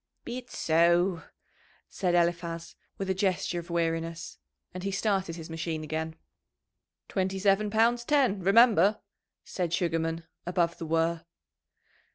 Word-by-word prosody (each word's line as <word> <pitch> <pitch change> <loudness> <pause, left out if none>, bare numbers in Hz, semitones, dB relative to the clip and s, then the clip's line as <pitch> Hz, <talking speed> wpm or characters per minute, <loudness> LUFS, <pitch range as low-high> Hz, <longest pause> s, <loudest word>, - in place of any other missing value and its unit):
"Be 240 +1 -4
it 250 - -16
so," 170 +2 +2 0.7
said 180 -2 -1
Eliphaz, 170 -1 -1 0.2
with 195 - -3
a - - +2
gesture 185 -2 0
of 170 +1 -10
weariness, 165 0 -2 0.3
and 185 - -6
he 195 - -2
started 195 -3 -1
his 165 -2 -8
machine 165 -1 -4
again. 160 +1 -4 0.9
"Twenty 190 0 -1
seven 200 +2 +2
pounds 230 +3 +2
ten, 260 -7 +2
remember," 205 0 +5 0.4
said 175 -3 -3
Sugarman, 165 -2 -1 0.2
above 175 -1 0
the 165 - -5
whirr. 165 +1 +1
175 Hz, 130 wpm, -28 LUFS, 165-195 Hz, 0.9 s, remember